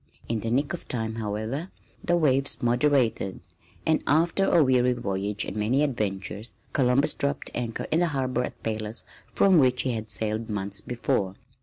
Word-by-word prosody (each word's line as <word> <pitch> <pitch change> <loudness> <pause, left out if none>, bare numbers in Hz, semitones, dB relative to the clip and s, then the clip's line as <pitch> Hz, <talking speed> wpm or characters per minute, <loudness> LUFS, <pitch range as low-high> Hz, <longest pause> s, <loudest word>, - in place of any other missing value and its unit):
In 115 -1 -1
the 115 - -3
nick 140 +7 +1
of 175 - -6
time, 110 -2 -2
however, 110 - -3 0.3
the 175 0 +2
waves 135 -5 +2
moderated, 120 -5 +2 0.5
and 160 -1 +3
after 165 +6 +3
a 170 -4 +5
weary 125 -2 +3
voyage 100 -3 -2
and - - -6
many 115 +7 +2
adventures 105 -4 -3 0.2
Columbus 130 0 +3
dropped 140 0 -2
anchor 115 -2 -3
in 160 - +3
the 175 - +3
harbor 130 -4 -1
at - - -7
Palos 110 0 -3 0.3
from 190 -4 +5
which 130 -2 +3
he 130 - 0
had 110 -2 -4
sailed 110 +3 0
months 100 -1 -2
before. 100 -5 -1
120 Hz, 165 wpm, -26 LUFS, 110-140 Hz, 0.5 s, a